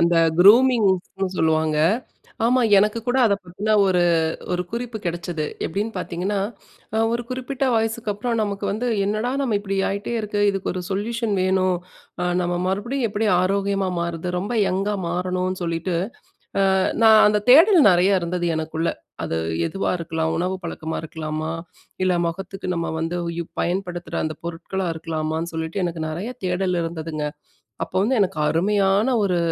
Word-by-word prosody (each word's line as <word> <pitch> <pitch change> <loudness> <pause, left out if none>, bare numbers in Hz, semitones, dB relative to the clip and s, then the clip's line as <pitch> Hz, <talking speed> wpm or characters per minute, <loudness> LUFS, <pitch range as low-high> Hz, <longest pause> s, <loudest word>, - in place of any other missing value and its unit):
அந்த 170 +1 +3 0.2
குரூமிங்ஸ்ன்னு 200 -3 +4
சொல்லுவாங்க. 155 -1 +2 0.7
ஆமா, 255 +1 +3 0.2
எனக்கு 210 +3 +2
கூட 250 +2 +2
அதை 200 - +3
பத்தின 200 +5 -2
ஒரு 180 -2 +3 0.5
ஒரு 180 0 0
குறிப்பு 235 -1 -4
கெடைச்சது. 170 -2 -3 0.2
எப்படின்னு 210 +6 -2
பார்த்தீங்கன்னா, 185 +3 -2 0.7
ஒரு 240 +1 -1
குறிப்பிட்ட 260 +1 -3
வயசுக்கு 225 -1 0
அப்பறம் 230 +2 -2
நமக்கு 200 -1 -3
வந்து 225 +5 -2 0.2
என்னடா 215 +4 -1
நம்ம 230 -6 +1
இப்படி 195 -1 -3
ஆயிட்டே 200 +4 -3
இருக்கு. 210 -1 -2
இதுக்கு 195 -1 -3
ஒரு 185 - -4
சொல்யூஷன் 220 +2 -1
வேணும். 185 -1 +2 0.5
அ - - +1 0.2
நம்ம 175 0 -1
மறுபடியும் 230 +6 -1
எப்படி 215 +2 -1
ஆரோக்கியமா 195 0 0
மாறுவது? 170 0 -3
ரொம்ப 205 +6 -3 0.2
யங்கா 195 +3 0
மாறணும்ன்னு 185 +1 -2
சொல்லிட்டு, 170 +1 -1 0.8
அ - - +3 0.3
நான் 220 -1 +8
அந்த 210 0 +2
தேடல் 335 - +8
நெறைய 185 +2 +4
இருந்தது 175 +1 -2
எனக்குள்ள. 160 +1 -1 0.3
அது 80 - -2 0.3
எதுவா 195 - -2
இருக்கலாம், 160 -1 -2
உணவு 180 +2 -1
பழக்கமா 160 -1 -4
இருக்கலாமா? 155 0 -4 0.5
இல்ல 185 -1 +3
முகத்துக்கு 190 +2 -5
நம்ம 170 0 -2
வந்து 165 +2 -2 0.2
யூ - - -1 0.2
பயன்படுத்துற 175 -1 -3
அந்த 155 0 -4
பொருட்களா 175 +2 -3
இருக்கலாமான்னு? 160 0 -3
சொல்லிட்டு, 160 +4 -3
எனக்கு 165 -2 -4
நெறைய 180 +9 -4 0.2
தேடல் 180 0 0
இருந்ததுங்க. 160 -2 -4 0.6
அப்போ - - -9
வந்து 255 +4 +1
எனக்கு 190 -4 0
அருமையான 195 +5 +2 0.2
ஒரு 180 -3 +1
190 Hz, 145 wpm, -22 LUFS, 170-210 Hz, 0.8 s, நான்